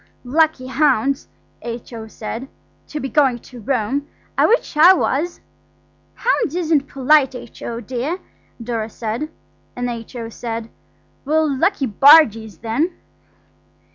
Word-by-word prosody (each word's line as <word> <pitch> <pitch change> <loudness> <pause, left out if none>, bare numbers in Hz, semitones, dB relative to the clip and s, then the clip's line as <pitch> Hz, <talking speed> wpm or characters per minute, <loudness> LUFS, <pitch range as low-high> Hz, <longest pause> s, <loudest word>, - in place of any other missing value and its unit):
"Lucky 305 0 +2
hounds," 275 -1 +1 0.3
H.O. 230 -1 -7
said, 225 +4 -6 0.4
"to 300 - -5
be 270 - -3
going 270 -3 +3
to 245 +1 -13
Rome. 265 +4 -1 0.3
I - - +4
wish 465 -7 +1
I 335 +5 +8
was." 340 -1 -1 0.7
"Hounds 460 - 0
isn't 315 -5 +1
polite, 275 0 +3
H.O., 235 -1 -7
dear," 255 - -3 0.4
Dora 230 -2 -3
said; 230 +7 -4 0.5
and 245 0 -2
H.O. 230 0 -7
said– 230 0 -5 0.5
"Well, 315 +2 +2
lucky 290 +1 +1
bargees, 225 - +5
then." 285 +11 -1
260 Hz, 115 wpm, -20 LUFS, 230-305 Hz, 0.7 s, I